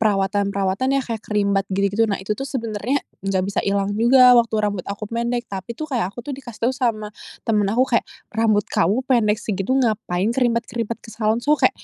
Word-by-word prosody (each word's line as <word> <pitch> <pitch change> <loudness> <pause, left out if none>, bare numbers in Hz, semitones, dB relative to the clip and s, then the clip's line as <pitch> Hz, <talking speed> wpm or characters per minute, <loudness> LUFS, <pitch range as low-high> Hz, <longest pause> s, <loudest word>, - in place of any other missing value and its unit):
perawatan-perawatan 200 +3 +1
yah - - -1
kayak 225 -2 -4
creambath 200 -2 0
gitu-gitu. 200 +3 +1
Nah 200 - -1
itu 195 +3 -2
tuh 270 - -6
sebenarnya 230 +1 -1 0.2
nggak 195 -1 0
bisa 200 - -1
ilang 200 0 0
juga 250 +3 +6
waktu 235 -2 +3
rambut 205 -3 -1
aku 200 +1 -5
pendek, 235 +2 -2
tapi 195 +4 -6
tuh 310 - -3
kayak 240 -10 -1
aku 200 - -19
tuh 290 - -3
dikasih 240 -4 -5
tau 260 - +1
sama 230 -5 -1 0.4
temen 215 -2 +2
aku, 250 +5 +2
kayak, - - +4 0.3
"Rambut 215 -2 +2
kamu 195 +9 +1
pendek 215 -5 +3
segitu 200 -1 -3
ngapain 215 -6 0
creambath-creambath 235 -2 -1
ke - - -11
salon?" 220 0 +1
So 290 +5 +3
kek, - - +3
220 Hz, 195 wpm, -21 LUFS, 200-240 Hz, 0.4 s, juga